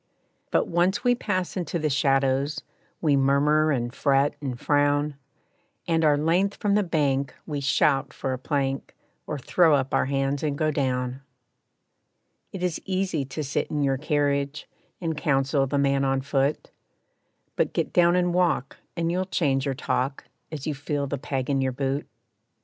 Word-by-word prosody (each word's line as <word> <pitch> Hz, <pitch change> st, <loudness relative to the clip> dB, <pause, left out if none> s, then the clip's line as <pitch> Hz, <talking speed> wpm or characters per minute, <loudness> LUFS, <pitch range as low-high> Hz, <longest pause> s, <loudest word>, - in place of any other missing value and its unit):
But -, -, +1 dB
once 175 Hz, +6 st, +1 dB
we 245 Hz, -1 st, +4 dB
pass 185 Hz, -6 st, -2 dB
into 175 Hz, -2 st, -2 dB
the 155 Hz, -2 st, 0 dB
shadows, 135 Hz, +1 st, +1 dB, 0.4 s
We 150 Hz, -4 st, +3 dB
murmur 145 Hz, +3 st, +3 dB
and 120 Hz, -3 st, -1 dB
fret 140 Hz, 0 st, +2 dB
and 130 Hz, -4 st, -4 dB
frown, 145 Hz, 0 st, +1 dB, 0.7 s
And, 165 Hz, -1 st, +2 dB
our 150 Hz, -2 st, +4 dB
length 175 Hz, +6 st, +1 dB
from 205 Hz, -3 st, 0 dB
the 210 Hz, -, +4 dB
bank, 140 Hz, -7 st, 0 dB
we 145 Hz, -3 st, -3 dB
shout 140 Hz, 0 st, +2 dB
for 135 Hz, -1 st, -3 dB
a 130 Hz, -, -4 dB
plank, 135 Hz, -1 st, -2 dB, 0.3 s
Or 150 Hz, -, -3 dB
throw 160 Hz, +3 st, +3 dB
up 135 Hz, -1 st, -1 dB
our -, -, +3 dB
hands 135 Hz, 0 st, 0 dB
and 145 Hz, -2 st, -1 dB
go 155 Hz, 0 st, +1 dB
down. 130 Hz, -2 st, -1 dB, 1.3 s
It 190 Hz, -2 st, -6 dB
is 180 Hz, -3 st, -1 dB
easy 185 Hz, -6 st, -1 dB
to 145 Hz, +3 st, -5 dB
sit 140 Hz, 0 st, -2 dB
in 150 Hz, -1 st, -1 dB
your 135 Hz, -1 st, +1 dB
carriage, 145 Hz, -1 st, 0 dB, 0.3 s
And 165 Hz, -3 st, -2 dB
counsel 135 Hz, -1 st, +1 dB
the 140 Hz, -, -1 dB
man 140 Hz, 0 st, +2 dB
on 135 Hz, 0 st, +1 dB
foot, 140 Hz, +1 st, -1 dB, 0.8 s
But -, -, +1 dB
get -, -, -1 dB
down 175 Hz, 0 st, +5 dB
and 180 Hz, -1 st, +1 dB
walk, 175 Hz, -7 st, +1 dB, 0.2 s
and 165 Hz, 0 st, 0 dB
you'll 185 Hz, +2 st, 0 dB
change 140 Hz, -7 st, 0 dB
your 135 Hz, -, -1 dB
talk, 135 Hz, +1 st, -2 dB, 0.3 s
As 150 Hz, -4 st, -6 dB
you 155 Hz, -, -1 dB
feel 145 Hz, +1 st, -2 dB
the 140 Hz, 0 st, -4 dB
peg 135 Hz, -2 st, -3 dB
in 135 Hz, -1 st, +1 dB
your 130 Hz, -1 st, 0 dB
boot. 135 Hz, +2 st, -2 dB
145 Hz, 170 wpm, -25 LUFS, 135-160 Hz, 1.3 s, down